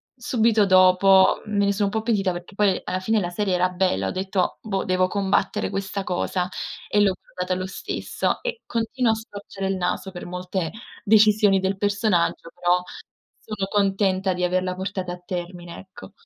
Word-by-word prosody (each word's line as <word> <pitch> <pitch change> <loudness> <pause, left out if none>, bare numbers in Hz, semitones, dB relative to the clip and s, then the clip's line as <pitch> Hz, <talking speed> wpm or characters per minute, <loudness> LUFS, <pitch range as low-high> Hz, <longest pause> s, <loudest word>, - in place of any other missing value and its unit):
subito 230 -4 +2
dopo 185 0 +5
me 200 -1 +1
ne 200 - +2
sò 200 0 0
un - - 0
po' 220 0 -1
pentita, 200 -5 +1
perché 175 +3 -8
poi 200 -3 +2
alla 185 +1 -2
fine 220 +3 +1
la 175 -2 -2
serie 195 -1 0
era 180 +1 +2
bella, 180 - 0
ho - - -2
detto: 190 -1 -1
"Boh, 195 -3 -2
devo 185 0 +2
combattere 200 0 0
questa 195 0 -3
cosa" 180 0 -1 0.4
e 205 - +3
l'ho 195 -2 +3
guardata 180 0 -4
lo 185 - -3
stesso 190 - -3
e 480 -2 -4
continuo 235 +1 0
a - - +1
storcere 205 -3 -7
il 195 - 0
naso 185 +1 -2
per 175 - -8
molte 180 -1 -3 0.3
decisioni 210 -2 +5
del 190 +1 -1
personaggio, 205 -5 0
però 180 +1 +1 0.6
sono 205 -3 -4
contenta 195 -2 +1
di 180 0 -3
averla 185 0 0
portata 185 -1 -4
a 180 - -10
termine, 175 -1 -6
ecco. 190 0 -13
190 Hz, 175 wpm, -23 LUFS, 180-205 Hz, 0.6 s, dopo